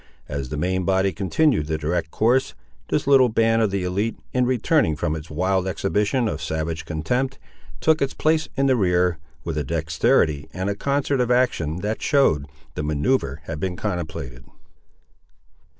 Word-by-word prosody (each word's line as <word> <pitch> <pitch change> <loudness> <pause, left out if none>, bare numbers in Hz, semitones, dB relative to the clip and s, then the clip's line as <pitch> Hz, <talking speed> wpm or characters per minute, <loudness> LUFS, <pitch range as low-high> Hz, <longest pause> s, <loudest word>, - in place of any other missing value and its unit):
As 70 -2 -4
the 75 - -4
main 95 +4 0
body 95 +1 +2
continued 100 - +1
the 80 -1 -1
direct 80 +2 -2
course, 120 +9 +1 0.3
this - - 0
little 135 -2 +5
band 115 0 +2
of 110 - +2
the 100 -1 -2
élite, 100 +5 -1 0.2
in 125 -1 +2
returning 130 - +2
from 80 +1 -1
its 80 +1 -8
wild 95 +4 0
exhibition 105 +6 0
of 80 -7 -3
savage 80 +1 -3
contempt, 125 - -1 0.4
took 160 0 +3
its 135 -1 0
place 155 0 +1
in 135 - +2
the 130 -1 +4
rear, 90 -5 +2 0.2
with 75 - -2
a - - -1
dexterity 80 -1 +1
and 95 +2 -2
a - - -3
concert 140 +2 0
of 125 - 0
action 90 - +1
that 105 +3 -2
showed 80 - +2 0.3
the - - -4
manoeuvre 75 - 0
had 75 0 -6
been 90 +2 -2
contemplated. 80 - -4
95 Hz, 165 wpm, -23 LUFS, 80-125 Hz, 0.4 s, little